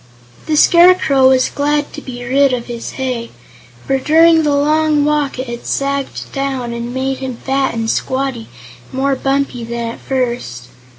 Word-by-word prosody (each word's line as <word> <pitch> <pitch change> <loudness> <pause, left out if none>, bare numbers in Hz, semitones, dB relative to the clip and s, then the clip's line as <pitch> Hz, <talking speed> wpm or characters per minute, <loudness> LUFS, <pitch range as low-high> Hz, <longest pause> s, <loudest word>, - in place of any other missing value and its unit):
The 310 - +1
Scarecrow 340 -5 +5
was 260 -1 +3
glad 295 +1 -1
to - - -7
be 245 -1 -8
rid 275 +2 +3
of 240 -1 -2
his 235 -1 -7
hay, 250 -3 -3 0.6
for 270 0 0
during 325 +3 +5
the 295 -2 +1
long 300 0 +2
walk 295 -3 0
it 255 - -3
had 240 -1 -7
sagged 275 0 -3
down 265 -3 -3
and 235 +1 -5
made 265 +1 -2
him 260 -2 -5
fat 270 -1 -1
and 225 -1 -2
squatty 260 0 -2 0.4
and 260 - -5
more 275 0 +1
bumpy 270 -2 -1
than 235 0 -4
at - - -11
first. 235 - -3
265 Hz, 170 wpm, -16 LUFS, 245-285 Hz, 0.6 s, Scarecrow